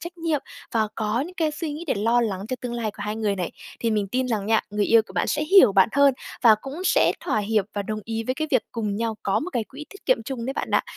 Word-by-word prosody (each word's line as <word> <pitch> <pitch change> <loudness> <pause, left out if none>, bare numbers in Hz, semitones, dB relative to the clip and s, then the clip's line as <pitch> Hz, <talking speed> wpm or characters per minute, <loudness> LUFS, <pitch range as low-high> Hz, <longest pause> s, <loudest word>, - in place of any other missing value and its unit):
trách 345 0 -8
nhiệm 320 -4 0 0.3
và 220 -2 +1
có 220 +2 -1
những 350 +6 -5
cái 320 -3 0
suy 305 0 -4
nghĩ 310 +4 -6
để - - +1
lo 230 +4 +2
lắng 200 -5 -1
cho 255 - -2
tương 245 -1 -4
lai 225 -3 -2
của 205 - -14
hai 210 +1 -2
người 210 -3 0
này. 180 -2 -2 0.3
Thì 230 - +1
mình 210 -2 0
tin 255 +4 -1
rằng 210 -3 -1
nha, 220 0 +3
người 205 0 0
yêu 230 -1 +5
của - - -13
bạn - - 0
sẽ 300 0 0
hiểu 330 - +7
bạn 195 +3 +5
hơn 280 -1 +5 0.3
và 225 -3 +8
cũng 295 +7 -7
sẽ - - +4
thỏa - - 0
hiệp 210 0 +1
và 205 - -1
đồng 215 +2 -4
ý 225 0 -3
với 255 - 0
cái 310 +1 -3
việc 255 -4 +3
cùng 210 -3 -2
nhau 225 -1 -2
có 195 - +1
một 360 - -4
cái 235 -3 -1
quỹ 285 +7 -10
tiết 400 - -15
kiệm - - +3
chung 255 -4 -5
đấy 270 - -1
bạn - - -3
ạ. - - +3
230 Hz, 295 wpm, -24 LUFS, 215-290 Hz, 0.3 s, và